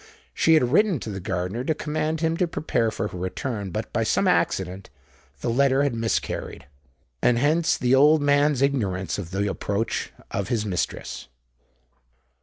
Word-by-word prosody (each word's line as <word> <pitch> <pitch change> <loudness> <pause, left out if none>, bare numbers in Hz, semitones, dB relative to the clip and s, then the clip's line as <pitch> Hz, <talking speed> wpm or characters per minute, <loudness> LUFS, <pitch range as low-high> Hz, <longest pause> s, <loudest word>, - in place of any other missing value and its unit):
She 160 - +4
had 125 -6 +2
written 200 +1 +3
to 110 - -5
the 95 - -5
gardener 95 +5 -3
to 155 +3 0
command 155 +1 -2
him 160 0 +1
to 180 - +1
prepare 120 -8 0
for 105 -1 -3
her - - -8
return; 100 +3 -4
but, 85 - -5
by - - +1
some - - +1
accident, 95 +2 0 0.5
the - - -1
letter 135 +2 +3
had 140 -3 0
miscarried—and 70 - -3
hence 155 +6 +2
the 125 +1 +1
old 150 +4 +6
man's 145 -1 +3
ignorance 100 -10 -1
of 90 -5 -6
the 100 +2 -1
approach 100 +2 -2 0.2
of 100 -1 -2
his 110 -2 -1
mistress. 95 -4 -3
120 Hz, 160 wpm, -24 LUFS, 95-145 Hz, 0.5 s, old